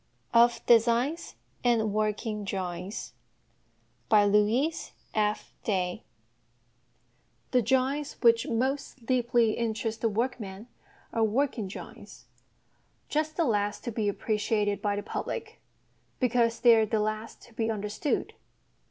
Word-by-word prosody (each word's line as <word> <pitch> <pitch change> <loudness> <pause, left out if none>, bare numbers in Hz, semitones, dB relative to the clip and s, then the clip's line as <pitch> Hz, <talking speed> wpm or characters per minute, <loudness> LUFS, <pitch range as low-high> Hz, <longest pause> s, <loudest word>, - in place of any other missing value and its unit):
OF 235 0 +4
DESIGNS 240 +7 +3 0.3
AND 225 -4 +2
WORKING 215 0 -1
DRAWINGS 185 0 -4 1.0
The 210 - +1 1.6
drawings 265 +5 +1
which 230 -1 +4
most 260 +1 -2
deeply 240 -2 +2
interest 225 -1 -2
the 230 - +2
workman 220 -2 -3 0.5
are 225 - +2
working 230 -1 0
drawings 190 - -10 0.8
just 310 +1 -1
the 335 - +2
last 205 -3 0
to 240 - -3
be 215 -2 0
appreciated 210 -1 0
by 205 -1 0
the 205 - -4
public, - - -5 0.6
because 235 -2 +2
they 235 -2 +8
are 220 -1 +3
the 215 +1 0
last 215 +1 -3
to 235 - -17
be 225 0 -1
understood. 210 +6 -2
225 Hz, 105 wpm, -28 LUFS, 210-240 Hz, 1.6 s, they